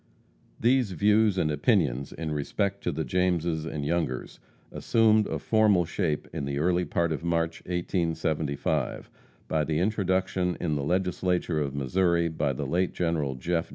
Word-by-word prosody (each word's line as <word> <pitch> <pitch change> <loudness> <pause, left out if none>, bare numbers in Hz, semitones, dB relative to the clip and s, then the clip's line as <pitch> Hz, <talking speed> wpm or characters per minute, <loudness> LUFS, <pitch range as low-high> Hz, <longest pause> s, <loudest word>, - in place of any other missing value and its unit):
These 120 -4 +2
views 105 +3 +3
and 75 -4 +1
opinions 75 - +1
in 80 -1 -5
respect 100 +7 -2
to 85 - +1
the 80 +1 -2
Jameses 85 +1 0
and 75 -3 -4
Youngers 80 -5 -2 0.3
assumed 110 -2 +3
a - - -2
formal 105 -5 +3
shape 80 -3 -2
in 80 -4 -3
the 70 0 -3
early 90 +3 +1
part 85 -1 0
of 80 - -3
March, 85 -1 -1
1875, 80 -5 -1 0.4
by 80 -1 +1
the 75 0 -1
introduction 95 -1 0
in 80 -4 -1
the 75 - -1
Legislature 90 0 0
of 70 -1 -3
Missouri 85 +4 +1
by 75 -3 -1
the 65 - -4
late 90 +1 0
General 80 -6 -1
Jeff. 85 +6 -2
85 Hz, 155 wpm, -27 LUFS, 75-95 Hz, 0.4 s, views